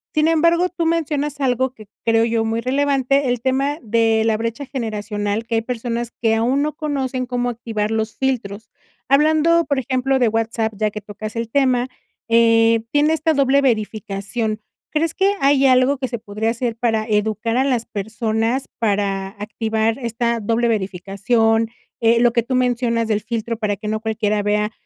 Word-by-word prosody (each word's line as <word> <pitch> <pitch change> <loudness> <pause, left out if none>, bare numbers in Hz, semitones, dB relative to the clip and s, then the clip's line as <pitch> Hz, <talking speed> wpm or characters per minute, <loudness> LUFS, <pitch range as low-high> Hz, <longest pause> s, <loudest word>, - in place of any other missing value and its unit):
Sin 305 +1 +3
embargo, 335 +2 +3
tú 335 -2 -2
mencionas 295 -3 -1
algo 260 0 0
que 215 - -13 0.2
creo 225 0 +3
yo 230 -1 0
muy 225 +1 -1
relevante, 275 +1 +1
el 245 -1 0
tema 270 +4 0
de 225 0 +2
la 225 -1 +2
brecha 230 +5 -3
generacional, 215 -4 -3
que 230 - -5
hay 225 - +2
personas 235 0 -3
que 225 -1 +2
aún 245 +6 +1
no 305 0 -2
conocen 270 -5 -2
cómo 245 0 -1
activar 220 -2 -3
los 220 0 -2
filtros. 220 -5 -3 0.4
Hablando, 315 +4 +4
por 285 - 0
ejemplo, 265 +1 0
de 245 -2 +3
WhatsApp, 225 0 -1
ya 215 +1 0
que 210 0 -7
tocas 210 +2 -8
el 230 -1 -3
tema, 255 -2 +2 0.4
eh, 230 0 +4
tiene 295 +2 +3
esta 320 -1 +1
doble 275 0 +3
verificación. 215 -2 -2 0.3
¿Crees 320 +1 0
que 390 +3 +2
hay 275 0 +4
algo 255 +2 +4
que 260 - -3
se 240 -1 -4
podría 215 +1 -3
hacer 235 0 -2
para 225 -2 0
educar 220 +2 0
a 260 - +3
las 245 -4 0
personas, 220 +4 -2
para 200 -3 0
activar 220 +3 -2
esta 235 -1 -1
doble 230 +2 0
verificación? 220 +3 0 0.3
Eh, 230 0 +4
lo 240 -1 +5
que 235 - +3
tú 255 +3 -3
mencionas 240 -2 +1
del 210 - +2
filtro 230 +1 -3
para 210 -2 -1
que 210 +2 -8
no 215 0 -1
cualquiera 215 -1 -1
vea 210 +1 0
230 Hz, 175 wpm, -20 LUFS, 220-265 Hz, 0.4 s, lo